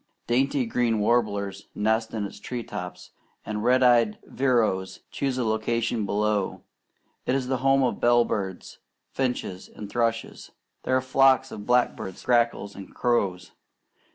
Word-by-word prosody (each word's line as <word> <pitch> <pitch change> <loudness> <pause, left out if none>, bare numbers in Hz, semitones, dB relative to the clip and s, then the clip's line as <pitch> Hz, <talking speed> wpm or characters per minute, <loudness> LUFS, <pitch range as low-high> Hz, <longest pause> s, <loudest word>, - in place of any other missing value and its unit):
Dainty 130 +2 +1
green 115 -1 +1
warblers 100 -3 0
nest 110 +2 +1
in 110 -2 -2
its 100 - -9
tree 120 +2 -5
tops, - - -7 0.3
and 105 0 -3
red 130 +2 +4
eyed 120 -4 +4
vireos 115 -8 0
choose 135 -2 -2
a 125 - 0
location 110 0 0
below. 105 -1 0 0.6
It 125 - +2
is 135 -2 -1
the 130 - +1
home 135 0 +4
of 125 - 0
bell 120 0 +4
birds, 95 -3 -4 0.3
finches, 125 -8 -3
and 105 -1 -9
thrushes. 115 -1 -2 0.4
There 130 - +3
are - - 0
flocks 135 0 +3
of 105 - -8
blackbirds, 125 -6 0
grackles, 115 -4 +1
and 100 -1 -11
crows. 100 -7 0
115 Hz, 145 wpm, -26 LUFS, 105-125 Hz, 0.6 s, red